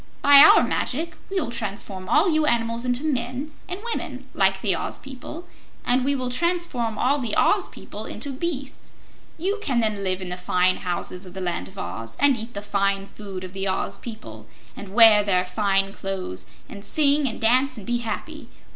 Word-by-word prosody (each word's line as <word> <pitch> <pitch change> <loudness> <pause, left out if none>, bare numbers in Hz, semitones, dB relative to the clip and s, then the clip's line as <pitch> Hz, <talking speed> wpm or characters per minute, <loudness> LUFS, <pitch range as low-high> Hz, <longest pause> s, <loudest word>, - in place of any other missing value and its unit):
"By 285 0 +8
our - - +9
magic 320 +5 -2
we 390 -1 0
will 265 -9 -3
transform 200 -4 -4
all - - +4
you 310 -3 +2
animals 230 0 +1
into 250 +2 0
men 260 0 -2 0.2
and 365 +2 -5
women 270 -6 -6
like 195 0 +2
the 195 -5 +1
Oz - - -3
people 275 +6 -9 0.4
and 250 +1 +2
we 280 +2 +1
will 255 -2 -3
transform 290 -8 0
all 280 +6 +2
the 240 -4 -1
Oz - - +3
people - - -9
into 285 - -5
beasts. 275 -2 -5 0.4
You 390 +6 -1
can 260 - 0
then 215 -3 0
live 185 -1 0
in 185 -1 -6
the 180 - -4
fine 180 0 +2
houses 180 +1 -4
of 180 - -12
the - - -5
Land 175 -2 -2
of 190 - -15
Oz, 115 -10 -6
and 285 -2 +5
eat 230 0 -7
the 200 - -5
fine 200 -1 0
food 195 -2 -8
of 185 0 -8
the 195 0 -2
Oz 190 - -1
people, 110 - -9 0.3
and 200 -2 -9
wear 225 -3 +8
their 185 -3 +1
fine 195 0 0
clothes, 190 - -5 0.2
and 200 - -10
sing 285 +4 +2
and 225 - -4
dance 255 +3 +2
and 205 - -9
be 240 0 0
happy. 225 -3 -6
230 Hz, 195 wpm, -24 LUFS, 195-275 Hz, 0.4 s, our